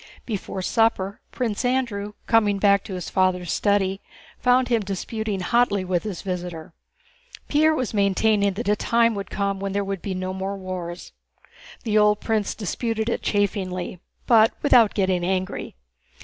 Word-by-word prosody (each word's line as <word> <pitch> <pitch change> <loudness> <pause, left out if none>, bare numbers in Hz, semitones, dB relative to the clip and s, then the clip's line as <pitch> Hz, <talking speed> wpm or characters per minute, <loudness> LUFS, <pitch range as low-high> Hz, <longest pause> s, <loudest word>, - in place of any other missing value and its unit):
Before 195 -4 -4
supper, 200 -2 +1
Prince 235 -3 -2
Andrew, 235 -5 -1
coming 210 -3 +3
back 200 -1 +3
to 190 - -6
his 180 - -5
father's 185 -2 +1
study, 195 -2 +1 0.4
found 250 0 +3
him 235 -3 +2
disputing 200 +1 -3
hotly 205 -2 +2
with 180 -2 0
his 205 -5 -6
visitor. 180 -3 -5 0.7
Pierre 310 +1 +3
was 255 -7 -2
maintaining 200 0 +2
that 215 +4 -5
a 210 - +3
time 230 +2 +2
would 200 -2 -5
come 200 -1 -2
when 195 0 -3
there 200 0 0
would 195 -2 -4
be 195 -2 -4
no 185 0 -3
more 190 +1 -4
wars. 180 -2 -6 0.7
The 215 -2 +2
old 210 0 +4
prince 215 -2 -1
disputed 220 +2 -2
it - - -1
chaffingly, 185 -3 -1 0.3
but 225 -1 +5
without 235 -7 +5
getting 185 -3 +1
angry. 185 +1 -2
200 Hz, 155 wpm, -23 LUFS, 190-225 Hz, 0.7 s, but